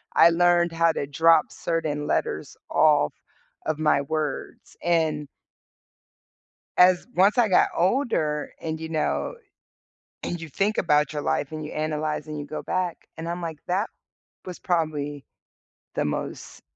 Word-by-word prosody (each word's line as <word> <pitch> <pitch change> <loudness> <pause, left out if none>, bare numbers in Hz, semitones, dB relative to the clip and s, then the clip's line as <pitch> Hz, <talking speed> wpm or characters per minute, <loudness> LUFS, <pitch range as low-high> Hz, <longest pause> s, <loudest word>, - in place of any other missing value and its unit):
I 170 - +8
learned 175 0 +3
how 165 0 +3
to 140 - -2
drop 160 +2 +4
certain 155 -3 -2
letters - - -1
off 150 - +4 0.5
of 155 -1 -1
my 150 -2 +3
words 155 -1 -4
and 155 -4 +1 1.5
as 180 0 +5
once 200 +6 +4
I 230 -4 +4
got 180 - +5
older 175 - +1
and, 160 -1 -3
you 160 0 -6
know, 165 - -1 0.9
and 175 -1 -3
you 165 - -7
think 200 +9 0
about 150 0 +3
your 150 -1 -3
life 145 +2 -1
and 155 -1 -5
you 150 - -7
analyze 155 0 -2
and 155 -1 -5
you 145 - -5
go 155 +1 -5
back, 185 -2 -1 0.2
and 165 +1 -5
I'm 175 +1 -3
like, 160 -3 -4
"That 190 +5 0 0.6
was 180 -2 -7
probably 150 -5 -1 0.7
the - - 0
most 75 - -5
160 Hz, 145 wpm, -25 LUFS, 150-175 Hz, 1.5 s, I